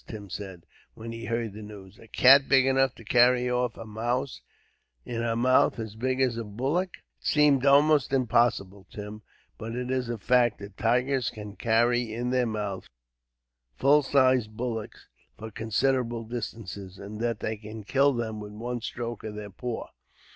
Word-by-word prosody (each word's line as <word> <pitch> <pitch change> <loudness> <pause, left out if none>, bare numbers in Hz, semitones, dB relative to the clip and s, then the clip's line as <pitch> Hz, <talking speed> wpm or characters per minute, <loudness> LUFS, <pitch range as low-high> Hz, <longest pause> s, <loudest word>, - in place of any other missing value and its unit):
Tim 105 -4 -9
said, 95 -4 -7 0.3
when 115 +1 -8
he 115 0 -7
heard 115 -3 -2
the 110 - -9
news; 105 -2 -12
"a 115 - -15
cat 135 +4 +6
big 135 -1 +5
enough 135 -1 +2
to - - -13
carry 125 +2 +4
off 125 0 -1
a - - -8
mouse 120 +5 -3 0.6
in 115 -1 -3
her 115 -1 0
mouth 130 +2 +3
as 110 -3 -5
big 130 +3 -1
as 125 -3 +1
a 115 - -3
bullock." 135 - -1 0.3
"It - - -7
seems 145 -2 +4
almost 145 -1 +5
impossible, 110 -7 +1
Tim, 105 +1 -8 0.4
but 115 +2 -5
it 125 +1 -3
is 130 -2 -1
a 120 - -2
fact 120 +1 +2
that 100 -1 -11
tigers 125 +3 +1
can 105 -2 -9
carry 120 +1 +1
in 120 +2 -3
their 125 -1 +2
mouths 105 -3 -4 0.9
full 145 +3 +5
sized 130 -6 +2
bullocks, 115 -3 -5 0.3
for 110 +1 -8
considerable 120 +2 0
distances, 110 -4 -7
and 105 +2 -8
that 115 -2 -1
they 110 - -2
can 110 +1 -9
kill 140 +6 +3
them 115 -4 -3
with 105 0 -8
one 120 +3 -4
stroke 120 -1 -5
of 110 -1 -6
their 105 -1 -7
paw. 120 +5 -5
115 Hz, 175 wpm, -27 LUFS, 110-125 Hz, 0.9 s, cat